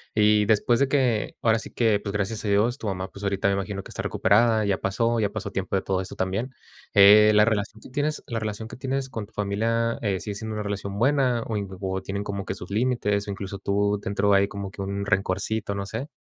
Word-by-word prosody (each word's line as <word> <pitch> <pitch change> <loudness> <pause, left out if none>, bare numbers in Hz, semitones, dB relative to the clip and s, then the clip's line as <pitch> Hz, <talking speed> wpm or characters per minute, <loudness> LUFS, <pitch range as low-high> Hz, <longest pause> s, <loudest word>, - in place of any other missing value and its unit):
Y 105 -1 +4
después 110 +3 +3
de 140 - +3
que, 130 -6 +1
ahora 115 -1 +3
sí - - -9
que, 110 -4 +2
pues, 100 -1 -5
gracias 105 +1 -2
a - - -1
Dios, 105 +5 +2
tu 110 - -6
mamá, 95 0 -3
pues, 100 - -11
ahorita 100 0 0
me 100 - +1
imagino 100 0 -4
que - - -13
está - - -5
recuperada, 110 +1 +3
ya 100 -2 +1
pasó, 115 +4 0
ya 105 -2 +1
pasó 100 -1 -5
tiempo 95 0 -2
de 95 - +1
todo 95 -1 -1
eso 95 - -8
también. 95 +8 -2 0.4
Eh, 105 +1 +8
la 105 - +7
relación 110 -1 -2
que - - -13
tienes 145 +3 -2
la 115 -2 -2
relación 110 0 -4
que - - -9
tienes 135 +1 -2
con 110 -5 -5
tu 105 - -26
familia 115 +3 0
eh, 100 -4 0
sigue 105 -2 -5
siendo 110 +1 -5
una 105 0 -3
relación 100 -1 -4
buena, 130 -1 +2
o 110 -2 -2
in 100 - -3
o 95 -1 -2
tienen 100 +1 -4
como 100 -1 -4
que - - -3
sus 90 - -9
límites, 105 -3 0
o - - -2
incluso, 100 0 -6
tú 100 +1 0
dentro 100 -1 +1
hay 100 0 +4
como 100 -1 -6
que 100 - -8
un 100 +1 -3
rencorcito, 100 +2 -1
no 100 0 -3
sé. 115 +8 -5
105 Hz, 245 wpm, -25 LUFS, 100-115 Hz, 0.4 s, Eh